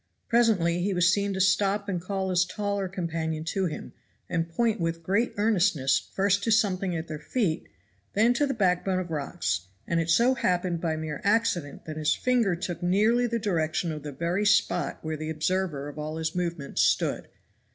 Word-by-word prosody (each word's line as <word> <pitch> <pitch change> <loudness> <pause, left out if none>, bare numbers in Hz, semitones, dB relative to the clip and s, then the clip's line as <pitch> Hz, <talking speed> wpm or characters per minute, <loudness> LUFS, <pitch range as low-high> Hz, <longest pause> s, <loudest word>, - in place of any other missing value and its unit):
Presently 200 -8 +3
he 195 +1 0
was 175 +1 +4
seen 200 0 0
to - - -3
stop 195 +2 +2
and 180 -4 -2
call 190 +1 -2
his 180 0 +4
taller 200 +1 -2
companion 165 -4 -3
to 185 +3 -1
him, 155 - -7 0.3
and 165 -1 -1
point 225 +5 0
with 165 0 -2
great 200 +8 +1
earnestness 200 -10 +2
first 195 0 +2
to - - 0
something 195 -4 +2
at 160 0 -4
their 155 -1 -6
feet, 175 - -1 0.4
then 225 +4 +4
to 290 +4 +1
the 270 - -2
backbone 185 -2 +1
of 180 -2 -3
rocks; 90 - -2 0.2
and 170 - 0
it 165 0 -1
so 235 +9 +4
happened 180 -8 0
by 160 -2 0
mere 155 -1 -5
accident 200 -8 0
that 155 -1 -6
his 155 0 +2
finger 240 -7 +2
took 175 0 -5
nearly 215 +7 +3
the 235 0 -1
direction 170 -5 -1
of 155 -1 -5
the 145 0 -6
very 170 +8 -1
spot 205 - +2
where 155 0 -2
the 155 +1 -5
observer 160 -2 -1
of 145 +1 -8
all 155 +1 -4
his 160 0 -2
movements 170 -5 -2
stood. - - +1
180 Hz, 190 wpm, -27 LUFS, 160-200 Hz, 0.4 s, was